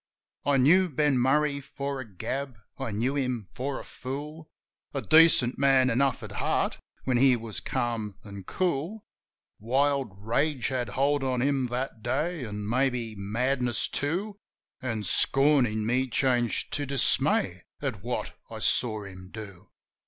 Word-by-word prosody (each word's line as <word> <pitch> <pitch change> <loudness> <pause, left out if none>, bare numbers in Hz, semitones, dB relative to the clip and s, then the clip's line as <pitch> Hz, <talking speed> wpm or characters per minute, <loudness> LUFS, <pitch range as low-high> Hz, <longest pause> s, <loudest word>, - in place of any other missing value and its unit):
I 140 -1 +4
knew 175 +8 +5
Ben 145 -2 +2
Murray 140 +3 +2
for 140 0 -5
a 130 - -7
gab; 130 +7 -4 0.2
I 135 -2 -3
knew 115 +6 -1
him 125 -7 -2
for 135 +2 -3
a - - -8
fool 150 +4 -7 0.2
— - - -51
A 135 - -1
decent 130 - +5
man 135 -2 +4
enough 135 +1 +1
at - - -7
heart - - -1 0.2
when 130 -2 +1
he 130 0 +5
was 115 -2 -5
calm 115 -4 -2
an' 100 -2 -9
cool 180 - -2 0.3
— - - -62
Wild 135 +2 +1
rage 125 +7 0
had 125 -4 -2
hold 140 +1 +2
on 130 -2 0
him 135 -2 +1
that 125 -1 -4
day, 155 +7 -1
an', 105 -1 -5
maybe, 125 -1 0
madness 120 +4 +1
too; 195 +8 -2 0.4
An' 115 -4 -3
scorn 135 +6 +4
in 110 0 -3
me 125 +3 +1
changed 120 -1 0
to 145 -1 -1
dismay 140 -1 +2
at - - -4
what - - -3
I - - -7
saw 110 -3 +2
him 95 -1 -11
do. 100 -5 -10
130 Hz, 155 wpm, -27 LUFS, 115-140 Hz, 0.4 s, knew